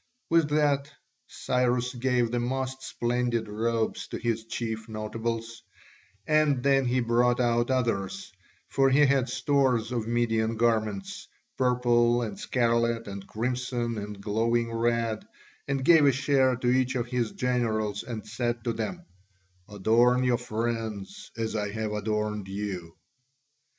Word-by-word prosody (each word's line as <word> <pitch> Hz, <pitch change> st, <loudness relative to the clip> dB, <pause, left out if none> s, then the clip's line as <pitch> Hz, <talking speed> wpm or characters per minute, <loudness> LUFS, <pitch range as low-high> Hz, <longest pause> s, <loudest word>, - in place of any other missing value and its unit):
With 165 Hz, -3 st, +4 dB
that 145 Hz, -1 st, +1 dB, 0.4 s
Cyrus 125 Hz, 0 st, 0 dB
gave 125 Hz, -2 st, +1 dB
the 120 Hz, -, 0 dB
most 130 Hz, +2 st, -2 dB
splendid 120 Hz, -3 st, -1 dB
robes 110 Hz, +2 st, -1 dB
to -, -, -5 dB
his 115 Hz, -1 st, -2 dB
chief 110 Hz, -1 st, -4 dB
notables, 115 Hz, +1 st, -4 dB, 0.6 s
and 155 Hz, -4 st, +2 dB
then 135 Hz, -1 st, +3 dB
he 125 Hz, +1 st, +1 dB
brought 120 Hz, +1 st, +2 dB
out 120 Hz, 0 st, +2 dB
others, 100 Hz, -7 st, -1 dB, 0.4 s
for 135 Hz, 0 st, +3 dB
he 145 Hz, +3 st, +5 dB
had 135 Hz, -2 st, +2 dB
stores 130 Hz, -3 st, +1 dB
of 115 Hz, -3 st, -2 dB
Median 115 Hz, -1 st, 0 dB
garments, 110 Hz, -4 st, -1 dB, 0.3 s
purple 120 Hz, -1 st, +3 dB
and 105 Hz, -3 st, -5 dB
scarlet 115 Hz, -2 st, +1 dB
and 100 Hz, -1 st, -7 dB
crimson 120 Hz, 0 st, -2 dB
and 105 Hz, 0 st, -7 dB
glowing 115 Hz, +3 st, 0 dB
red, 115 Hz, -1 st, 0 dB, 0.4 s
and 135 Hz, -1 st, -1 dB
gave 160 Hz, -3 st, +7 dB
a -, -, +6 dB
share 135 Hz, -1 st, +2 dB
to 125 Hz, 0 st, -3 dB
each 130 Hz, 0 st, +1 dB
of 120 Hz, -2 st, 0 dB
his 120 Hz, -2 st, -2 dB
generals 110 Hz, -5 st, -1 dB
and 115 Hz, -2 st, -6 dB
said 120 Hz, -2 st, -2 dB
to 115 Hz, -, -1 dB
them, 115 Hz, +11 st, -4 dB, 0.6 s
"Adorn 115 Hz, +5 st, +3 dB
your 125 Hz, -1 st, +2 dB
friends, 115 Hz, -, -4 dB
as 110 Hz, -1 st, -2 dB
I 105 Hz, -1 st, -1 dB
have 110 Hz, -1 st, -2 dB
adorned 105 Hz, -1 st, -2 dB
you." 95 Hz, -4 st, -5 dB
120 Hz, 135 wpm, -27 LUFS, 110-125 Hz, 0.6 s, gave